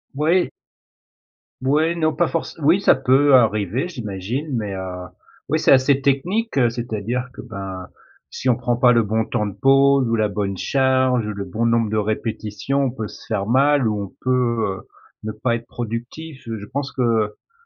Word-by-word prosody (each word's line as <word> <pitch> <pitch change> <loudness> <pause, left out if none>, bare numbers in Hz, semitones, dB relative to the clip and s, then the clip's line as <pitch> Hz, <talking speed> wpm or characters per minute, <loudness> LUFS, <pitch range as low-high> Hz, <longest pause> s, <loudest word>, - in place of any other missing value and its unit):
Ouais 165 +5 +3
et - - -7 1.1
Ouais 150 +5 +2
non 155 -2 0
pas 175 - +1
forcé 165 - -3
oui 160 +6 +4
ça 195 - +5
peut 135 +2 +4
arriver 110 - +2
j'imagine 120 - -4
mais 105 -4 -3
heu, 90 -1 -6 0.4
oui, - - +2
c'est - - +3
assez 135 +1 +5
technique, 180 +12 0
c'est-à-dire 120 +1 -3
que, - - -9
ben, 95 -5 -7 0.4
si 130 - -2
on 120 - +4
prend 120 0 -1
pas 125 0 +5
le 120 -1 +4
bon 110 +1 0
temps 105 - -1
de 100 - -6
pause 135 +3 +4
ou 115 - +1
la 110 -1 +2
bonne 100 -1 -2
charge 130 -1 +2
ou 105 - -3
le 100 -1 -5
bon 115 +3 -2
nombre 115 -1 +2
de 110 - -1
répétitions, 110 +5 -2
on 130 - -1
peut 110 -4 -5
se - - -13
faire 105 -3 -2
mal 135 +2 +3
ou 105 -1 -1
on 100 - -8
peut, 130 - +1 0.5
heu, - - -14 0.4
ne 110 - -3
pas 115 +3 -1
être 115 0 -7
productif. 120 +6 -6
Je 110 -3 -6
pense 140 +1 -4
qu'au 115 - -1
120 Hz, 185 wpm, -21 LUFS, 105-135 Hz, 1.1 s, ça